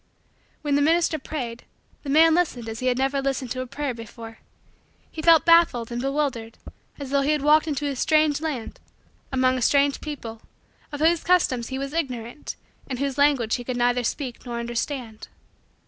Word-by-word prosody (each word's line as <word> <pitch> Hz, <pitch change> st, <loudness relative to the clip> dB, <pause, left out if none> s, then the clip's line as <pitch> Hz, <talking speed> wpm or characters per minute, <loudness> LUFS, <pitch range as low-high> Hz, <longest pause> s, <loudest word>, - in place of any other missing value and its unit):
When 290 Hz, -1 st, 0 dB
the 285 Hz, -, +3 dB
minister 325 Hz, +1 st, +2 dB
prayed, 245 Hz, -5 st, -6 dB, 0.4 s
the 285 Hz, -, -7 dB
man 320 Hz, +3 st, +6 dB
listened 310 Hz, -9 st, 0 dB
as 225 Hz, 0 st, -5 dB
he 255 Hz, -, -2 dB
had 250 Hz, -1 st, +2 dB
never 270 Hz, +1 st, 0 dB
listened 270 Hz, -3 st, -2 dB
to 255 Hz, -, -2 dB
a 255 Hz, -, -5 dB
prayer 285 Hz, +1 st, -3 dB
before. 230 Hz, 0 st, -10 dB, 0.7 s
He 315 Hz, -, -6 dB
felt 325 Hz, 0 st, +6 dB
baffled 335 Hz, -9 st, +4 dB
and 240 Hz, 0 st, -3 dB
bewildered 270 Hz, -5 st, -2 dB, 0.4 s
as 275 Hz, -2 st, -7 dB
though 280 Hz, 0 st, +3 dB
he 290 Hz, +2 st, +2 dB
had 295 Hz, -2 st, -1 dB
wandered 305 Hz, +2 st, +4 dB
into 295 Hz, -1 st, -2 dB
a 280 Hz, -1 st, -2 dB
strange 305 Hz, +2 st, +2 dB
land, 295 Hz, -8 st, -4 dB, 0.5 s
among 255 Hz, -1 st, +2 dB
strange 280 Hz, +3 st, +2 dB
people, 235 Hz, -7 st, -7 dB, 0.5 s
of 290 Hz, 0 st, -6 dB
whose 330 Hz, +1 st, +3 dB
customs 265 Hz, -10 st, +2 dB
he 265 Hz, -, -4 dB
was 275 Hz, +1 st, -5 dB
ignorant, 255 Hz, -5 st, -4 dB, 0.3 s
and 255 Hz, -, -3 dB
whose 275 Hz, +1 st, -2 dB
language 275 Hz, -6 st, +3 dB
he 245 Hz, -, -7 dB
could 245 Hz, 0 st, -4 dB
neither 245 Hz, 0 st, +2 dB
speak 250 Hz, 0 st, -4 dB
nor 240 Hz, -2 st, -5 dB
understand. 235 Hz, -1 st, -4 dB
275 Hz, 180 wpm, -24 LUFS, 240-300 Hz, 0.7 s, man